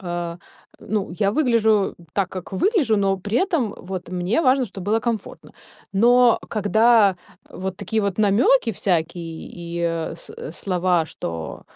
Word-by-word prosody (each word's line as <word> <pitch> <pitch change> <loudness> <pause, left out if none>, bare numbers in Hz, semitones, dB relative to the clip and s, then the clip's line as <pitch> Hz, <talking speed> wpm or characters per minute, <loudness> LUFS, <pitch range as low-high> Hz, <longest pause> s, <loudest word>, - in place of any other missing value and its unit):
А, 175 -2 -4 0.4
ну, 205 -2 -2
я 200 -2 +2
выгляжу 220 -7 +2 0.2
так, 195 -2 0
как 185 0 -8
выгляжу, 275 - +2
но 195 -1 +1
при 205 +5 -1
этом 285 - -1
вот 185 -1 -7
мне 180 - 0
важно, 260 -2 +3
чтобы 195 -2 -9
было 225 - +3
комфортно. 230 -2 -4 0.4
Но, 240 +4 +5
когда 220 -1 +4 0.3
вот 190 0 -5
такие 220 +3 -1
вот 200 0 -2
намёки 225 +4 +3
всякие 170 -3 -2
и, 170 0 -6
э, 165 -1 -2
с - - -10 0.2
слова, 180 -1 0
что, 80 - -6
200 Hz, 145 wpm, -22 LUFS, 175-225 Hz, 0.4 s, Но